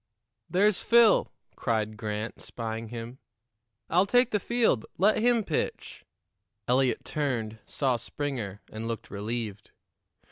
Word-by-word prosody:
"There's 195 Hz, +3 st, +3 dB
Phil," 235 Hz, -2 st, +5 dB, 0.2 s
cried 110 Hz, -2 st, -1 dB
Grant, 105 Hz, 0 st, -4 dB
spying 115 Hz, -1 st, -5 dB
him. 120 Hz, +3 st, -7 dB, 0.7 s
"I'll 180 Hz, +4 st, +3 dB
take 245 Hz, +1 st, +4 dB
the 210 Hz, -, +2 dB
field. 230 Hz, -, +2 dB
Let 205 Hz, +5 st, +4 dB
him 235 Hz, 0 st, +3 dB
pitch." 160 Hz, -, -3 dB, 0.6 s
Eliot 130 Hz, +1 st, +2 dB
turned, 115 Hz, -7 st, -2 dB
saw 130 Hz, -4 st, +1 dB
Springer, 115 Hz, -6 st, -4 dB
and 110 Hz, +1 st, -5 dB
looked 115 Hz, -1 st, -5 dB
relieved. 105 Hz, 0 st, -4 dB
125 Hz, 115 wpm, -28 LUFS, -, 0.7 s, Phil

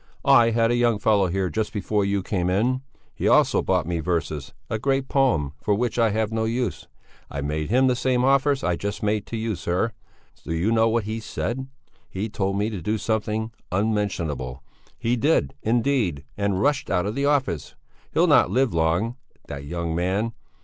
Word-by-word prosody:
"I 135 Hz, -5 st, +6 dB
had 115 Hz, 0 st, +2 dB
a -, -, +2 dB
young 120 Hz, -2 st, +3 dB
fellow 100 Hz, -2 st, +3 dB
here 95 Hz, 0 st, -1 dB
just 110 Hz, +5 st, -1 dB
before 105 Hz, 0 st, 0 dB
you 100 Hz, -1 st, 0 dB
came 90 Hz, -3 st, -1 dB
in; 120 Hz, +8 st, +1 dB, 0.3 s
he -, -, -2 dB
also -, -, +4 dB
brought -, -, +1 dB
me 85 Hz, 0 st, -2 dB
verses, 80 Hz, -4 st, -2 dB, 0.2 s
a 110 Hz, -, -2 dB
great 135 Hz, +2 st, 0 dB
poem, 120 Hz, -, +1 dB
for 105 Hz, -, +1 dB
which 120 Hz, +2 st, -1 dB
I 115 Hz, -1 st, +4 dB
have 110 Hz, +1 st, -1 dB
no 110 Hz, 0 st, 0 dB
use. 115 Hz, -7 st, -2 dB, 0.4 s
I 70 Hz, -, -4 dB
made 75 Hz, +2 st, -2 dB
him 130 Hz, +4 st, +4 dB
the 125 Hz, -1 st, +3 dB
same 125 Hz, 0 st, +1 dB
offers 140 Hz, +1 st, +3 dB
I 90 Hz, -, +1 dB
just 100 Hz, +4 st, -4 dB
made 105 Hz, 0 st, 0 dB
to 115 Hz, -, -4 dB
you, 110 Hz, -1 st, -2 dB
sir; 90 Hz, +6 st, -1 dB, 0.5 s
do 80 Hz, -, -4 dB
you 90 Hz, +7 st, +1 dB
know 115 Hz, 0 st, +4 dB
what 115 Hz, 0 st, +1 dB
he 110 Hz, +2 st, -4 dB
said? 120 Hz, +4 st, -4 dB, 0.4 s
He 105 Hz, +4 st, -3 dB
told 100 Hz, -2 st, -1 dB
me 105 Hz, +2 st, 0 dB
to 100 Hz, -5 st, -5 dB
do 105 Hz, +7 st, -1 dB
something 110 Hz, +1 st, -1 dB, 0.2 s
unmentionable. 85 Hz, -, -1 dB, 0.3 s
He 115 Hz, +2 st, 0 dB
did, 125 Hz, -, +2 dB
indeed, 115 Hz, -, +1 dB
and 100 Hz, -2 st, 0 dB
rushed 145 Hz, +7 st, +1 dB
out 90 Hz, -1 st, +1 dB
of 105 Hz, -, -2 dB
the 140 Hz, +3 st, -1 dB
office. 135 Hz, -, 0 dB, 0.4 s
He'll -, -, +3 dB
not -, -, +5 dB
live 130 Hz, -4 st, +1 dB
long, 85 Hz, +9 st, +1 dB, 0.3 s
that 70 Hz, 0 st, -6 dB
young 85 Hz, +1 st, -3 dB
man! 95 Hz, +7 st, 0 dB
105 Hz, 190 wpm, -24 LUFS, 90-120 Hz, 0.5 s, I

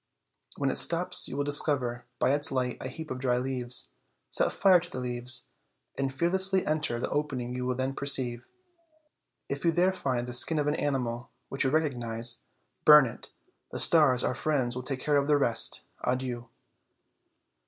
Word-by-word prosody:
When -, -, 0 dB
it -, -, 0 dB
stops -, -, +3 dB
you 135 Hz, -, -6 dB
will 145 Hz, -, 0 dB
discover, 135 Hz, -4 st, +1 dB
by 130 Hz, +2 st, +1 dB
its 145 Hz, +2 st, +2 dB
light, 125 Hz, -2 st, -2 dB
a -, -, -5 dB
heap 160 Hz, +4 st, -9 dB
of 130 Hz, -, -5 dB
dry 125 Hz, -2 st, 0 dB
leaves. 125 Hz, -, -2 dB, 0.4 s
Set -, -, +1 dB
fire 185 Hz, -2 st, +4 dB
to 175 Hz, +1 st, -9 dB
the 130 Hz, -, -6 dB
leaves, 125 Hz, 0 st, +2 dB, 0.4 s
and 135 Hz, -1 st, -2 dB
fearlessly 190 Hz, +6 st, +1 dB
enter 155 Hz, -6 st, -1 dB
the -, -, -3 dB
opening 130 Hz, -5 st, -3 dB
you 125 Hz, 0 st, -4 dB
will 125 Hz, -, -1 dB
then 130 Hz, +1 st, -3 dB
perceive; 130 Hz, -3 st, +2 dB, 1.0 s
if 140 Hz, 0 st, -5 dB
you 170 Hz, -, +3 dB
there 180 Hz, +3 st, +1 dB
find 130 Hz, -9 st, -3 dB
the 125 Hz, -, -7 dB
skin 155 Hz, +6 st, +2 dB
of 150 Hz, -, 0 dB
an 150 Hz, -, 0 dB
animal 125 Hz, -5 st, -3 dB, 0.2 s
which 135 Hz, -, -2 dB
you -, -, +2 dB
recognize, 120 Hz, -6 st, 0 dB, 0.4 s
burn 150 Hz, -2 st, +8 dB
it; 115 Hz, -, -9 dB, 0.4 s
the -, -, -5 dB
stars, 140 Hz, -7 st, +4 dB
our -, -, 0 dB
friends, 130 Hz, -3 st, -1 dB
will 125 Hz, -, -4 dB
take 130 Hz, 0 st, -5 dB
care 145 Hz, +1 st, +1 dB
of 140 Hz, 0 st, 0 dB
the 150 Hz, -1 st, +3 dB
rest. 120 Hz, -5 st, 0 dB, 0.2 s
Adieu." 125 Hz, -1 st, -3 dB
130 Hz, 180 wpm, -28 LUFS, 125-150 Hz, 1.0 s, burn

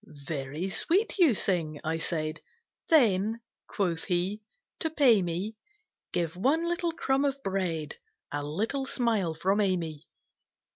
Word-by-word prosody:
"Very 150 Hz, +3 st, -3 dB
sweet 385 Hz, -, +1 dB
you 315 Hz, -, +6 dB
sing," 165 Hz, -7 st, 0 dB
I 160 Hz, +1 st, -1 dB
said; 155 Hz, -1 st, -2 dB, 0.5 s
"Then," 225 Hz, -, +4 dB, 0.3 s
quoth 175 Hz, -5 st, -1 dB
he, 185 Hz, +3 st, 0 dB, 0.4 s
"to 320 Hz, -, 0 dB
pay 265 Hz, -9 st, +5 dB
me, 180 Hz, +5 st, -3 dB, 0.5 s
Give 170 Hz, -1 st, -1 dB
one 275 Hz, -, +2 dB
little 345 Hz, 0 st, 0 dB
crumb 270 Hz, -3 st, +1 dB
of 280 Hz, -1 st, +1 dB
bread, 180 Hz, -6 st, -2 dB, 0.3 s
A 145 Hz, 0 st, -2 dB
little 220 Hz, -, -2 dB
smile 220 Hz, -12 st, 0 dB
from 190 Hz, +6 st, +2 dB
Amy." 170 Hz, -6 st, -1 dB
190 Hz, 130 wpm, -29 LUFS, 165-255 Hz, 0.5 s, you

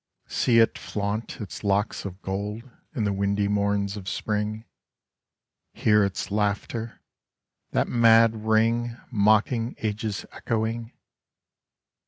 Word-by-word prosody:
^ -, -, -19 dB
See 120 Hz, -2 st, +3 dB
it 115 Hz, 0 st, +4 dB
flaunt 105 Hz, +2 st, -3 dB
its 105 Hz, -1 st, -7 dB
locks 100 Hz, +1 st, 0 dB
of 95 Hz, 0 st, -7 dB
gold 105 Hz, +3 st, -3 dB, 0.3 s
In 115 Hz, -, 0 dB
the 100 Hz, -1 st, +1 dB
windy 100 Hz, +1 st, 0 dB
morns 100 Hz, 0 st, 0 dB
of 95 Hz, -3 st, -6 dB
Spring; 105 Hz, +2 st, -2 dB, 1.1 s
Hear 105 Hz, -1 st, +3 dB
its 100 Hz, 0 st, -3 dB
laughter 105 Hz, +2 st, -2 dB, 0.3 s
— -, -, -56 dB
that -, -, +2 dB
mad 115 Hz, -2 st, +4 dB
ring 115 Hz, +2 st, +2 dB
Mocking 110 Hz, +2 st, +2 dB
Age's 105 Hz, -1 st, -3 dB
echoing. 115 Hz, 0 st, -2 dB
105 Hz, 120 wpm, -25 LUFS, 100-115 Hz, 1.1 s, it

